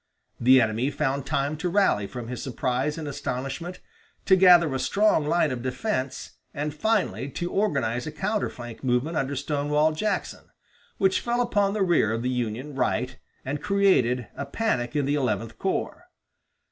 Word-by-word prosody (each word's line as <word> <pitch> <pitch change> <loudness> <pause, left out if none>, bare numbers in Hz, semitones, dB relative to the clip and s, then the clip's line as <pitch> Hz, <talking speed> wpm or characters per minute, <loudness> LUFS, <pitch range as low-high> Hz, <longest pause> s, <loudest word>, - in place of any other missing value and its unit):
The 130 +2 +6
enemy 115 +3 +1
found 140 -2 -2
time 145 0 0
to 180 +3 -2
rally 175 - +2
from 120 0 -7
his 125 +1 -5
surprise 130 +2 -1
and 155 -2 -5
astonishment, 140 +5 -4 0.4
to 190 - +6
gather 175 -5 +6
a 130 - -1
strong 200 -6 +2
line 160 -2 +2
of 125 -2 -4
defense, 130 - -3 0.2
and 150 +1 -2
finally, 195 -5 0
to 175 +5 -4
organize 135 - 0
a - - -4
counter 200 +7 -1
flank 120 0 -10
movement 130 +6 0
under 140 -1 -1
Stonewall 150 +2 +1
Jackson, 210 +8 -3 0.5
which 190 -1 +2
fell 240 0 -1
upon 205 -5 +1
the 205 - +2
rear 170 - +2
of 115 +1 -2
the 125 - 0
Union 125 +3 -3
right 125 -1 -1 0.3
and 140 +2 -3
created 130 - +2
a 140 - -5
panic 135 - -1
in 145 -2 +1
the 140 - 0
Eleventh 115 -5 -1
Corps. 270 - -3
145 Hz, 165 wpm, -25 LUFS, 125-180 Hz, 0.5 s, The